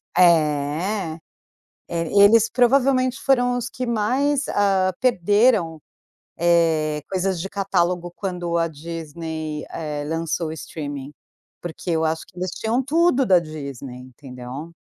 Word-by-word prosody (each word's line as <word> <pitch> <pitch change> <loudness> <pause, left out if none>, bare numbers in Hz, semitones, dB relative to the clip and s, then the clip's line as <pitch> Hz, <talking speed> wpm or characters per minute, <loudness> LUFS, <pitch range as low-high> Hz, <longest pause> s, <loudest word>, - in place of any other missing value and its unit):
É, 160 +2 +2 0.7
é, 165 -1 -2 0.2
eles 225 +2 +6
provavelmente 255 0 +2
foram 245 -2 +2
os 245 -1 -3
que 255 - -5
mais, 260 +6 0
ah, 190 -2 +2
perderam, 205 -6 +2 0.6
eh, 160 -3 +2
coisas 190 -2 -1
de 195 - -4
catálogo 180 -3 -1
quando 175 -3 -3
a 165 - +2
Disney, 160 0 -6
eh, 150 -2 -4
lançou 165 +1 -2
o - - -5
streaming, 145 -3 -7 0.5
porque 175 +1 -6
eu 160 -1 +1
acho 160 0 -1
que 200 - -23
eles 185 0 -2
tinham 230 +7 -1
tudo 285 -2 +2
da 185 -2 +6
Disney, 140 -6 -7
entendeu. 130 +3 -9
170 Hz, 125 wpm, -22 LUFS, 155-215 Hz, 0.7 s, eles